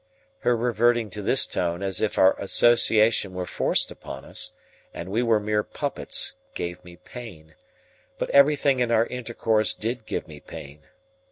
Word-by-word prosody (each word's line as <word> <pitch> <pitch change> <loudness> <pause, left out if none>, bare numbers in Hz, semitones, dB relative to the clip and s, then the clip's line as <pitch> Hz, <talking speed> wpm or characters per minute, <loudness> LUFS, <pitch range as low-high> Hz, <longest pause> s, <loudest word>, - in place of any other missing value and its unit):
Her 120 -1 +1
reverting 120 -1 0
to 105 - -5
this 130 +6 +6
tone 85 +2 -3
as 95 -1 -1
if 110 - -2
our 95 0 +5
association 110 -2 +3
were 90 0 -4
forced - - +1
upon 65 - -10
us, - - -2 0.4
and 85 - -7
we 110 +5 -1
were 115 -3 +2
mere 105 0 -1
puppets, - - -2 0.2
gave 85 0 -6
me 90 -1 -14
pain; 90 -6 -12 0.6
but - - -4
everything 140 -1 +3
in 120 -1 0
our 115 0 +2
intercourse 115 -3 0
did 115 0 -5
give - - -4
me 75 -2 -12
pain. 70 +1 -12
110 Hz, 160 wpm, -24 LUFS, 90-120 Hz, 0.6 s, this